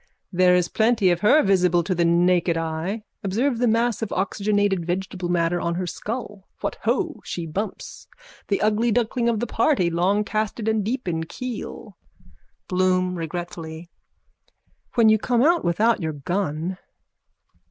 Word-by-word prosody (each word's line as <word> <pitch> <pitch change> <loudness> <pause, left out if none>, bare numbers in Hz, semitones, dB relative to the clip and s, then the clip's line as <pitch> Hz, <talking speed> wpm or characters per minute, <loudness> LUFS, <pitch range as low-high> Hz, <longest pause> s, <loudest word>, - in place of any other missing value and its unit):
There 180 -1 +4
is 180 -1 +2
plenty 220 -4 +2
of 175 - 0
her 250 - +5
visible 180 -3 +3
to 185 - -1
the 175 -1 +1
naked 170 0 +3
eye. 165 +6 -3 0.2
Observe 230 +6 0
the 245 - +2
mass 230 +1 +1
of 220 - -3
oxygenated 200 -1 0
vegetable 180 +1 -3
matter 175 0 +1
on 170 0 -1
her 185 +1 -2
skull. 210 +2 -6
What - - -3
ho, 340 -6 0
she 170 - -5
bumps! 195 +7 -5 0.4
The 200 - 0
ugly 215 +2 +2
duckling 235 +1 +1
of 225 -2 0
the 240 - -1
party, 225 - +1
longcasted 210 +5 0
and 220 -1 +1
deep 245 +2 -3
in 165 -2 -1
keel. 250 +6 -7 0.7
BLOOM: 185 -1 +1
(Regretfully.) 165 0 -6 1.0
When 230 -2 +5
you 220 0 +5
come 240 +2 +1
out 340 +3 +3
without 215 +6 +2
your 160 -1 -2
gun. 175 +3 -3
190 Hz, 150 wpm, -23 LUFS, 175-220 Hz, 1.0 s, her